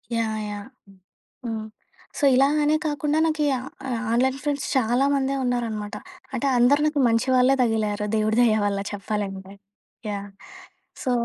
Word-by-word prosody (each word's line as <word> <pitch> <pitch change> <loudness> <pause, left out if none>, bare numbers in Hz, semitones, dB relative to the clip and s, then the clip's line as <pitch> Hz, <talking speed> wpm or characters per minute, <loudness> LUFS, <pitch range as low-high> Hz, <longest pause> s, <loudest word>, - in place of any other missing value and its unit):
Yeah! 220 -1 -1
Yeah! 205 +3 -7 0.8
హ్మ్, 220 -2 -3 0.5
so, - - -6
ఇలా 270 +2 +5 0.2
అనే 300 +1 +3
కాకుండా 295 0 0
నాకి 310 -2 0
ఆ - - -4 0.5
ఆన్‌లైన్ 260 +3 +1
ఫ్రెండ్స్ 285 -2 -2
చాలా 250 +1 +2
మందే 275 0 0
ఉన్నారన్నమాట. 225 -4 -2 0.4
అంటే 260 +3 -1
అందరూ 270 +5 +4
నాకు 300 -2 +1
మంచి 230 +2 +1
వాళ్ళే 255 +2 +4
తగిలారు 215 -2 0
దేవుడి 215 +1 +1
దయ 220 -2 +3
వల్ల 200 -1 0
చెప్పాలంటే. 195 -2 -4 0.6
యాహ్! 200 0 -5 0.8
సో 255 - 0
235 Hz, 140 wpm, -24 LUFS, 215-270 Hz, 0.8 s, ఇలా